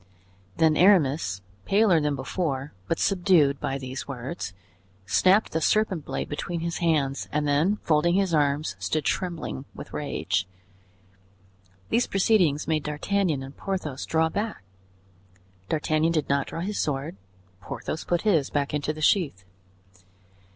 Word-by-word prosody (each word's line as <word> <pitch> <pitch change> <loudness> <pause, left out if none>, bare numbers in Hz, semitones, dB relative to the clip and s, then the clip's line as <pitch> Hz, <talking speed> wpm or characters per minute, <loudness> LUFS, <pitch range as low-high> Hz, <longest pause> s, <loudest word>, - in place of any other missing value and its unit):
Then 160 -1 +4
Aramis, 150 - +3 0.2
paler 195 -5 +4
than 150 -1 0
before, 140 0 -3
but 165 - 0
subdued 175 -8 +3
by 135 - -2
these 130 0 -6
words, 135 - -5 0.5
snapped 185 - +3
the 160 - -1
serpent 190 -5 +1
blade - - -3
between 165 +3 -4
his 170 0 -3
hands, 150 -5 0
and 150 0 0
then 150 +8 +2
folding 170 +2 +3
his 195 -3 +1
arms, 145 0 +1
stood 155 -2 -1
trembling 170 - -2
with - - -10
rage. 95 - -1 1.4
These 240 - +2
proceedings 185 -7 +2
made 155 -1 +1
D'Artagnan 150 +1 -1
and 135 +1 -10
Porthos 155 -8 -4
draw 160 0 +2
back. 210 - -3 1.1
D'Artagnan 155 +1 +1
did 155 -3 0
not 140 0 +1
draw 165 - -5
his 205 +3 -3
sword; 140 -2 -2 0.4
Porthos 155 - -5
put 175 -1 0
his 170 -10 +2
back 145 -1 -1
into 150 +1 -1
the 155 - -9
sheath. 145 - +2
155 Hz, 135 wpm, -26 LUFS, 140-180 Hz, 1.4 s, Then